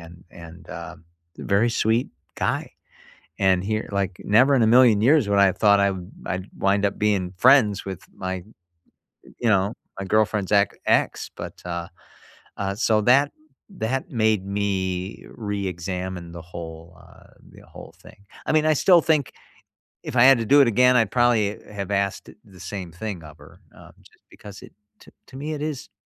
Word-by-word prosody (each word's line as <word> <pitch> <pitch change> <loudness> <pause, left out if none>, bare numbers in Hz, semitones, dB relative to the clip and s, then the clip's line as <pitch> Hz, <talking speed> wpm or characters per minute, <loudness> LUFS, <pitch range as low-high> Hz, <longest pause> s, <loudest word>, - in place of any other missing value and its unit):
and 85 +1 -14
and, 85 0 -13
uh, - - -8 0.4
very 100 +4 +1
sweet 115 +3 +1 0.3
guy. - - -2 0.7
And 95 -2 +2
he 110 +2 -2
like, 100 -2 -2
never 130 +7 +4
in 120 - +3
a - - +3
million 115 -3 +5
years 135 -2 +3
would 100 - +2
I 100 - +6
have 95 - 0
thought 100 -1 +5
I'd 100 -1 +2 0.3
I'd 95 +1 -4
wind 100 +1 +1
up 100 - -2
being 100 -4 0
friends 120 -5 +4
with 95 -2 -6
my, 95 -1 -5 1.0
you 120 - 0
know 100 +1 +1 0.3
my - - -4
girlfriend's 105 -1 +1
ex 100 -2 +3
ex. - - +1
But, - - -9
uh 85 -1 -4 0.7
uh, 100 -1 -3
so 110 -1 +2
that 135 +6 +4 0.4
that 135 - -3
made 110 -5 +1
me 95 -1 -3
reexamine 95 -4 -5
the 85 - -9
whole, 85 0 -10
uh - - -19 0.2
the - - -17
whole - - -13
thing. 100 - -18 0.2
I - - 0
mean, 155 0 +3
I 155 - +4
still 175 +4 +5
think, 150 -5 +1 0.7
if - - -7
I 120 - +6
had 135 -1 +7
to 115 - -2
do 145 +5 +5
it 135 - +4
again, 125 +3 +4
I'd 115 -4 +1
probably 115 -4 +2
have 100 -1 -5
asked 100 -1 -2 0.2
the 95 -3 -17
same 90 -2 -7
thing 90 -1 -6
of 75 0 -13
her, - - -17 0.2
uh, - - -15
just - - -23
because 100 -2 -12
it - - -15 0.3
t - - -18 0.2
to 130 - -12
me, 150 +3 -4
it 150 - -6
is 150 -4 -5
100 Hz, 175 wpm, -23 LUFS, 95-120 Hz, 1.0 s, had